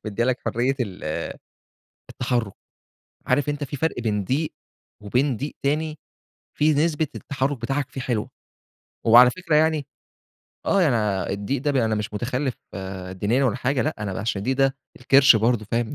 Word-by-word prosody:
مديِّة 110 +2 -1
لك 130 0 +1
حرية 125 +4 +1
ال 100 -7 -4 1.1
التحرُّك. 120 -5 -1 0.7
عارف 145 0 +2
أنت 145 0 -2
في 140 - -6
فرق 160 -3 -1
بين 105 -4 -1
ضِيق 150 - -1 0.5
وبين 125 +5 +1
ضِيق 145 +7 -5
تاني، 155 +2 -1 0.6
فيه 155 0 +4
نسبة 160 -1 0
التحرُّك 140 0 -2
بتاعك 135 +3 -1
فيه 135 - -6
حلوة. 120 -4 -2 0.8
وعلى 120 +2 +8
فكرة 165 0 0
يعني 155 -2 +2 0.8
آه. 200 - +3
أنا 105 -6 0
الضِيق 100 +7 -2
ده 140 -5 +2
أنا 110 - 0
مش 105 0 -4
مُتخلِّف 125 +4 -1 0.6
دينيًا 105 +8 +1
ولا 125 -1 +1
حاجة 130 +1 0
لأ، 155 - -1
أنا 100 - -3
علشان 105 -1 -1
الضِيق 130 +6 -1
ده 135 0 +2 0.2
الكِرش 135 0 +6
برضه 110 0 +1
فاهم. 120 +3 0
130 Hz, 155 wpm, -24 LUFS, 115-145 Hz, 1.1 s, وعلى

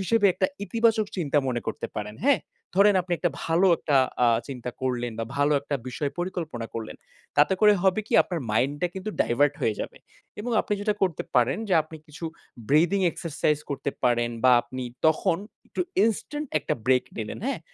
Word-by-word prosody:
হিসেবে 205 +2 +3
একটা - - +2 0.2
ইতিবাচক 225 -1 +2
চিন্তা 150 -5 +1
মনে 120 -2 -1
করতে - - -3
পারেন, 105 0 -4
হ্যাঁ? 280 -2 +4 0.4
ধরেন 200 +1 +6
আপনি 175 0 -5
একটা 175 - +1
ভালো 165 +4 +3
একটা 145 - +1 0.3
আ - - +5 0.2
চিন্তা 125 -2 -5
করলেন 120 -2 -1
বা 115 - -1
ভালো 145 +1 +3
একটা 140 0 -2
বিষয় 140 +3 -2
পরিকল্পনা 165 -9 -3
করলেন। 110 -1 -5 0.4
তাতে 145 +6 +5
করে 210 -1 +7
হবে 190 +2 +3
কি, - - -8
আপনার 175 -3 -4
মাইন্ডটা 140 +9 +1
কিন্তু 190 +2 -4
ডাইভার্ট 145 +4 +3
হয়ে 110 - +1
যাবে - - -6 0.4
এবং 240 +4 -4
আপনি - - -4
যেটা 210 0 0
করতে 180 -5 +1
পারেন 125 - +3
যে, 185 - +3
আপনি 160 +1 -11
কিছু 155 +2 -9 0.4
ব্রিদিং 170 +7 +4
এক্সারসাইজ 155 -2 -1
করতে 140 0 -2
পারেন 120 -1 +2
বা 130 - +7
আপনি 130 0 -7 0.2
তখন 165 +3 +2 0.3
একটু 190 - -5 0.2
ইনস্ট্যান্ট 295 +7 -2
একটা - - -2
ব্রেক 130 -1 +4
নিলেন, 110 -1 -4
হ্যাঁ? 275 - -2
155 Hz, 180 wpm, -26 LUFS, 130-190 Hz, 0.4 s, করে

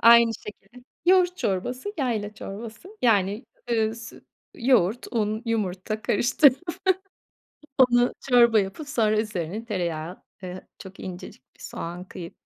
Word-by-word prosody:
Aynı 235 0 +8
şekilde, 210 +4 -12 0.2
yoğurt 360 -1 +5
çorbası, 250 - -2
yayla 215 -6 -1
çorbası. 225 - -8
Yani, 205 0 +2 0.3
ııı, 220 -1 +1
sü 230 0 -11 0.3
yoğurt, 235 -3 +2
un, 215 -1 0
yumurta 215 -1 -2
karıştırıp 255 +3 +4 1.2
onu 245 -1 +5 0.2
çorba 235 -3 +6
yapıp, 200 +10 -5
sonra 220 -6 +2
üzerine 210 0 -4
tereyağı, 175 -5 -3 0.2
eee, 185 0 -7
çok 190 0 -11
incecik 180 -7 -8
bir - - -24
soğan 175 +2 -6
kıyıp, 170 -2 -8
220 Hz, 120 wpm, -25 LUFS, 190-245 Hz, 1.2 s, Aynı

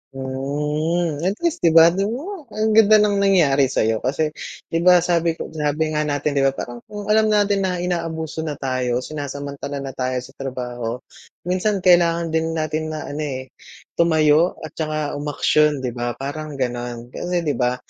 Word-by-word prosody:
Hmm 150 +5 -2
at 195 - 0
least 340 -2 0
'di 165 -1 +3
ba? 165 +1 +8
Tignan 195 +3 -1
mo 320 +1 -7
ang 215 0 -1
ganda 215 0 +6
ng 210 -1 +3
nangyari 160 -9 +4
sa'yo, 110 -3 0
kasi 150 +4 -1 0.4
'di 165 - +1
ba 180 0 +5
sabi 170 -2 +1
ko - - -7
sabi 155 0 -1
nga 150 0 0
natin 145 0 -1
'di 140 -1 +2
ba, 135 - -1
parang 120 -2 -6
kung 210 0 -4
alam 220 0 +4
natin 205 -1 +2
na 180 - -1
inaabuso 165 -3 -3
na 155 -2 -3
tayo, 130 -2 -1
sinasamantala 140 -1 -5
na 135 - -5
tayo 130 0 -2
sa 130 - -12
trabaho, 125 -2 -4 0.4
minsan 185 +2 0
kailangan 170 -2 +4
din 160 0 0
natin 155 0 -2
na 155 -1 -5
ano 145 - -6
eh, 130 -3 -4 0.5
tumayo 160 0 +4
at 155 - -7
saka 155 -2 -2
umaksyon 150 -1 +1
'di 125 - -1
ba 120 0 -3
parang 145 +3 -6
ganon. 120 -2 -4
Kasi 175 -1 -2
'di 150 - 0
ba, 125 0 +2
155 Hz, 180 wpm, -21 LUFS, 135-175 Hz, 0.5 s, ba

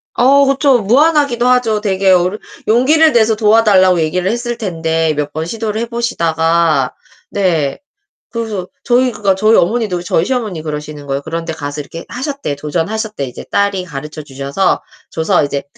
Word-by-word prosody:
어 275 +3 +5
그쵸. 275 -2 +3
무안하기도 270 +2 +3
하죠. 240 -4 +2
되게 195 -2 +1
어르 185 +3 +2 0.3
용기를 300 +8 +4
내서 220 -1 +3
도와달라고 210 -5 +4
얘기를 180 +5 0
했을 240 0 -3
텐데 165 -6 -1
몇 145 0 -2
번 160 +1 -3
시도를 220 +2 -3
해 - - -1
보시다가 170 -8 0 0.4
네. 165 -8 0 0.5
그래서 215 -6 -4 0.2
저희 250 +1 +2
그러니까 205 -3 0
저희 215 +3 +3
어머니도 200 -2 0
저희 165 -1 +1
시어머니 220 -10 -2
그러시는 150 -1 -6
거예요. 135 0 -2
그런 165 +3 -5
데 160 - -4
가서 145 -1 -5
이렇게 165 +3 -9
하셨대. 275 - -4
도전하셨대. 175 - -3
이제 125 - -9
딸이 200 -2 +1
가르쳐 150 0 -7
주셔서 140 +6 -1 0.3
줘서 160 -1 +1
이제 140 -1 -2
195 Hz, 380 characters per minute, -15 LUFS, 160-235 Hz, 0.5 s, 어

